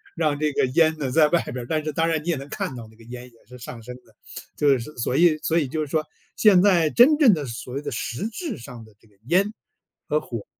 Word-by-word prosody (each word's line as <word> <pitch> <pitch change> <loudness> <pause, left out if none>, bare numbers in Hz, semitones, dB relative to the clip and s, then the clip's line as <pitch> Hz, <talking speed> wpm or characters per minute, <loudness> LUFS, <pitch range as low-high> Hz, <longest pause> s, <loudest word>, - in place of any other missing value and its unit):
让 150 -2 0
这 150 -2 0
个 130 - +1
烟 160 +4 +2
呢 135 -3 -2
在 150 +3 +4
外 170 - +2
边 125 - -7
儿， 120 - -5
但 155 -1 -1
是 155 - -3
当 165 +3 0
然 160 -2 -1
你 175 - -5
也 165 - +2
能 140 +1 -8
看 130 - -4
到 115 -2 -9
那 - - -21
个 115 - -18
烟 120 +1 -9
也 120 -2 -17
是 125 +1 -12
上 115 0 -9
升 125 +2 -9
的。 110 - -24 0.4
就 145 - +2
是 135 +6 -9
所 125 +2 -1
以 160 -2 +4
所 165 +2 0
以 145 -5 +1
就 155 +4 -3
是 150 - -3
说 155 +2 -1 0.3
现 200 -5 +5
在 175 -6 +3
真 290 +5 +6
正 260 -10 +6
的 150 -4 -3
所 120 +2 -8
谓 140 - -3
的 - - -5
实 120 - -4
质 315 - -5
上 120 -2 -11
的 110 - -20
这 110 - -25
个 100 - -29
烟 195 +4 +2 0.6
和 150 +1 0
火， 115 -4 -7
150 Hz, 295 characters per minute, -23 LUFS, 125-165 Hz, 0.6 s, 真